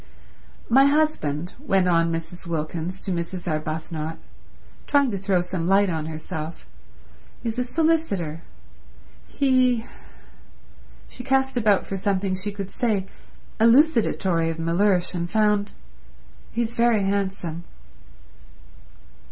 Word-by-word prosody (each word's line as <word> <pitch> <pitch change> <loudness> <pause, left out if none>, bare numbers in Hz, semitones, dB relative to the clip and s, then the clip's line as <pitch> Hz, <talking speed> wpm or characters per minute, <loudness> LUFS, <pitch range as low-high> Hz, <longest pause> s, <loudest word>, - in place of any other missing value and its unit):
"My 265 +4 +6
husband," 195 - 0
went 195 -10 +1
on 165 -1 +3
Mrs. 165 +2 -5
Wilkins 165 +3 -3
to 195 - -2
Mrs. 175 +1 -4
Arbuthnot, 155 0 -3 0.7
trying 280 -3 +3
to 200 - -2
throw 190 -2 +1
some 175 -1 -3
light 195 0 +4
on 160 -1 -3
herself, 160 - -6 0.8
"is 230 +1 -2
a - - +2
solicitor. 250 - 0 0.9
He—" 255 -4 +2 1.2
She 250 - -9
cast 265 0 +1
about 215 -5 +3
for 195 - -4
something 195 -1 0
she 190 +2 -3
could 200 -1 -6
say 215 -6 0 0.5
elucidatory 225 - +3
of 165 - -4
Mellersh, 180 +3 +1
and 175 -1 -3
found: 210 0 +2 0.8
"He's 235 0 -2
very 230 -3 +3
handsome." 190 -4 -2
195 Hz, 110 wpm, -24 LUFS, 170-230 Hz, 1.2 s, My